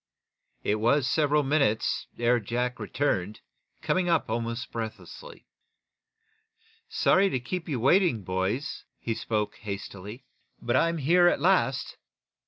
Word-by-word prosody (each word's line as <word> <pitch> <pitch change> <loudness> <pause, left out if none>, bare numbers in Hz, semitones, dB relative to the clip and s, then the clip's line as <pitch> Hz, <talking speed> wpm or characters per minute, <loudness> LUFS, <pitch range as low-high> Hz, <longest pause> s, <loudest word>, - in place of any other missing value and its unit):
It 105 - +1
was 130 +4 +2
several 150 0 +2
minutes 135 -6 +1
ere 120 +1 +2
Jack 125 +3 -2
returned, 105 -8 -2 0.4
coming 185 -1 +1
up 160 -9 +1
almost 115 +2 -3
breathlessly. 115 - -8 1.4
"Sorry 195 +1 +3
to 130 - -1
keep 165 +8 -5
you 135 -5 -1
waiting, 135 - +3
boys," 95 +9 -2
he 115 - -3
spoke, 105 -1 -2
hastily. 100 +3 -7 0.3
"But 120 - -1
I'm 165 0 +2
here 175 +5 +4
at 175 - +2
last." 160 -6 +1
125 Hz, 120 wpm, -27 LUFS, 110-155 Hz, 1.4 s, here